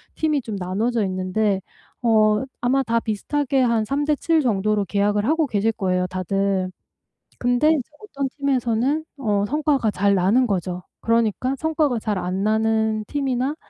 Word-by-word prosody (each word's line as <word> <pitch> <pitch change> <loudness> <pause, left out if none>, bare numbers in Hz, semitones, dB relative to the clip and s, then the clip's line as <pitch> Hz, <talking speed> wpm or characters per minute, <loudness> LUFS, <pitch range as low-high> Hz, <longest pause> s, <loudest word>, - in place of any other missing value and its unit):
팀이 305 -3 0
좀 220 -4 -6
나눠져 210 +6 -1
있는데 190 +2 0 0.4
어 215 -2 +3 0.2
아마 265 +2 +2
다 230 -1 +1
비슷하게 265 +5 -1
한 235 -3 +2
3 280 +5 -1
대 300 - +2
7 325 +2 +1
정도로 210 -4 +1
계약을 205 +2 +1
하고 315 +3 +2
계실 220 -2 0
거예요 185 -3 0
다들. 185 0 -1 0.7
근데 245 +5 +2
이제 305 -5 +1
어떤 280 -10 -3
팀에서는 265 +1 0
어 205 -6 0
성과가 290 -5 +1
잘 200 +1 +2
나는 200 +8 +3
거죠. 180 -2 -2 0.2
그러니까 230 +3 +1
성과가 310 -5 0
잘 210 -3 -2
안 185 +2 -2
나는 220 0 +1
팀이나 275 0 -1
225 Hz, 295 characters per minute, -22 LUFS, 200-270 Hz, 0.7 s, 어